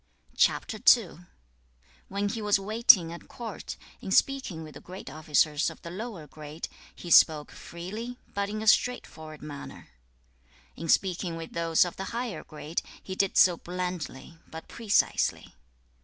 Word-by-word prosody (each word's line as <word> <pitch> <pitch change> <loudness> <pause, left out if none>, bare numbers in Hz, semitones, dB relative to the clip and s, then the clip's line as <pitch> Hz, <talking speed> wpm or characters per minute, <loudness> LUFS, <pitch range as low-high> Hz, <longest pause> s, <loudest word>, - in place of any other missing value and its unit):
When 200 +1 -1
he 225 +1 -4
was 210 -1 +3
waiting 195 -5 +5
at 170 - -11
court, 230 -3 -7 0.2
in - - -6
speaking 200 -6 +1
with 155 -1 -10
the - - -11
great 180 -6 -9
officers 155 0 +2
of 165 - -12
the 170 - -7
lower 195 -4 -6
grade, 150 +2 -8 0.3
he 175 - -8
spake 155 -3 +6
freely, 215 +8 -7 0.2
but 200 0 -1
in 215 +1 -4
a - - -5
straightforward 160 -11 +1
manner; 145 -2 -9 0.9
in 165 - -6
speaking 180 -2 +1
with 165 0 -8
those 165 0 +3
of 175 - -6
the 195 - -4
higher 240 -3 -4
grade, 155 +1 -4 0.2
he 190 - -6
did 195 0 0
so 175 -2 +6
blandly, 175 -4 -5
but 160 0 -9
precisely. 220 -3 +1
175 Hz, 140 wpm, -28 LUFS, 160-205 Hz, 0.9 s, spake